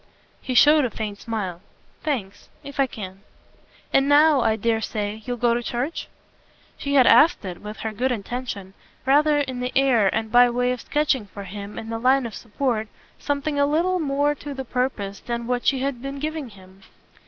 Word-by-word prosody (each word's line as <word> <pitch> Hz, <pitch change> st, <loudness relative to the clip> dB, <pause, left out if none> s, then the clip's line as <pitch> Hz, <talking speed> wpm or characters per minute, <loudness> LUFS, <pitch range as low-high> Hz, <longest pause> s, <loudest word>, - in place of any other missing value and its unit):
He 255 Hz, -, -4 dB
showed 295 Hz, +4 st, +7 dB
a 250 Hz, -, 0 dB
faint 210 Hz, -2 st, -5 dB
smile. 195 Hz, -7 st, -4 dB, 0.4 s
"Thanks. 215 Hz, -10 st, -4 dB
If 280 Hz, 0 st, -10 dB
I 275 Hz, -, +4 dB
can." 195 Hz, -5 st, -8 dB, 0.7 s
"And 270 Hz, +1 st, +4 dB
now 295 Hz, -1 st, +6 dB
I 220 Hz, -, +2 dB
dare 225 Hz, +1 st, 0 dB
say 210 Hz, 0 st, -3 dB
you'll 245 Hz, 0 st, -3 dB
go 240 Hz, 0 st, +2 dB
to 240 Hz, -, 0 dB
church?" 245 Hz, +7 st, -3 dB, 0.7 s
She 280 Hz, 0 st, -2 dB
had 260 Hz, -3 st, +7 dB
asked 310 Hz, -, +5 dB
it, 180 Hz, -2 st, -6 dB
with 210 Hz, +1 st, -8 dB
her 220 Hz, -, -2 dB
good 250 Hz, +5 st, -1 dB
intention, 220 Hz, -3 st, -5 dB, 0.3 s
rather 290 Hz, +2 st, +4 dB
in 260 Hz, -3 st, -4 dB
the 250 Hz, 0 st, -2 dB
air 255 Hz, -6 st, +4 dB
and 220 Hz, +3 st, -1 dB
by 245 Hz, 0 st, +7 dB
way 245 Hz, +1 st, +1 dB
of 250 Hz, -2 st, -3 dB
sketching 290 Hz, -7 st, 0 dB
for 200 Hz, +1 st, -9 dB
him, 200 Hz, +2 st, -8 dB
in 225 Hz, -, -6 dB
the 225 Hz, -, -3 dB
line 260 Hz, +2 st, +3 dB
of 230 Hz, -, -6 dB
support, 225 Hz, 0 st, -2 dB, 0.3 s
something 285 Hz, 0 st, -1 dB
a 285 Hz, -, +4 dB
little 350 Hz, +5 st, +1 dB
more 290 Hz, -1 st, +1 dB
to 290 Hz, 0 st, -8 dB
the 265 Hz, 0 st, -5 dB
purpose 230 Hz, -6 st, -2 dB
than 235 Hz, -1 st, -4 dB
what 245 Hz, 0 st, -1 dB
she 265 Hz, -2 st, +3 dB
had 270 Hz, -3 st, -2 dB
been 275 Hz, +1 st, -5 dB
giving 305 Hz, -2 st, -4 dB
him. 190 Hz, -1 st, -17 dB
245 Hz, 195 wpm, -23 LUFS, 215-280 Hz, 0.7 s, showed